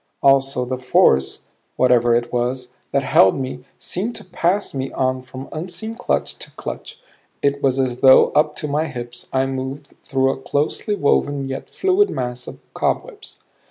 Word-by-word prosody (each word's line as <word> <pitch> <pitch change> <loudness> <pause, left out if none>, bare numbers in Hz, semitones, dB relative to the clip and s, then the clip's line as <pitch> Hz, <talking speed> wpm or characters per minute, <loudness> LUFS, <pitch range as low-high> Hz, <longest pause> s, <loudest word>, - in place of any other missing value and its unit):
Also 135 -2 +3
the 130 0 -3
force, 65 - +3 0.3
whatever 120 -2 +4
it 120 +1 -1
was, 125 +1 -1 0.2
that 140 0 +1
held 95 -4 +4
me 130 -1 -5
seemed 215 +7 -3
to - - -8
pass 185 +2 0
me 135 -1 -3
on 130 -1 0
from 130 +1 -9
unseen 180 +7 -5
clutch 245 - -2
to - - -6
clutch; 460 0 -7 0.4
it 140 0 +1
was 135 -2 +2
as 130 -2 0
though 130 -1 +7
up 150 0 +2
to 150 - -3
my 150 +3 0
hips 120 -2 -7
I 130 0 +1
moved 135 +2 -5
through 135 0 +1
a 135 - -7
closely 150 +10 -1
woven 145 -4 +1
yet 135 - -6
fluid 385 +2 +2
mass 125 0 -4
of - - -8 0.2
cobwebs. - - -3
135 Hz, 165 wpm, -20 LUFS, 125-150 Hz, 0.4 s, though